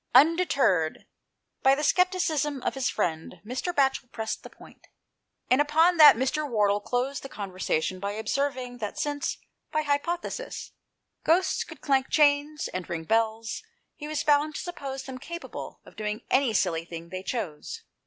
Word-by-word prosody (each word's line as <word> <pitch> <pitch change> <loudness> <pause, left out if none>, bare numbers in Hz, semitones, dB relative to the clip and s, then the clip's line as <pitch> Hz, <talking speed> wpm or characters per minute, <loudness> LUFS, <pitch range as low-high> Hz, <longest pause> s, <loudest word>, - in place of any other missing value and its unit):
Undeterred 270 - +4 0.6
by 270 +1 +5
the 300 - -3
scepticism 310 -6 +1
of - - 0
his 265 -2 0
friend, 165 +1 -2
Mr. 255 +10 -2
Batchel 270 -5 +1
pressed 220 -1 -4
the - - -10
point, - - -17 0.6
and 255 +3 +4
upon 320 +4 +4
that, 300 -5 +10
159 - - -6
anOST 260 0 +1
TALES, 305 -1 -1
Mr. - - -12
Wardle 205 -2 +3
closed 250 +5 -1
the 270 - -8
conversation 185 -4 -2
by 200 +2 -3
observing 250 +2 -2
that 210 -3 -4
since, 290 -1 -2 0.3
by 310 0 +1
hypothesis, 340 +11 -2 0.5
ghosts 355 +4 +2
could - - -12
clank 270 -2 +2
chains, 295 0 +3
and 185 -1 -5
ring 165 -1 -3
bells, 225 +3 0 0.3
he 295 - -7
was 305 -1 -2
bound 295 +1 +3
to - - -3
suppose 275 -6 -5
them 265 -1 -7
capable 340 +5 -7
of - - -16
doing 215 +1 -3
any 260 -2 +4
silly 165 -5 +1
thing 170 0 -9
they 185 +1 -5
chose. 190 -8 -5
265 Hz, 165 wpm, -27 LUFS, 215-300 Hz, 0.6 s, that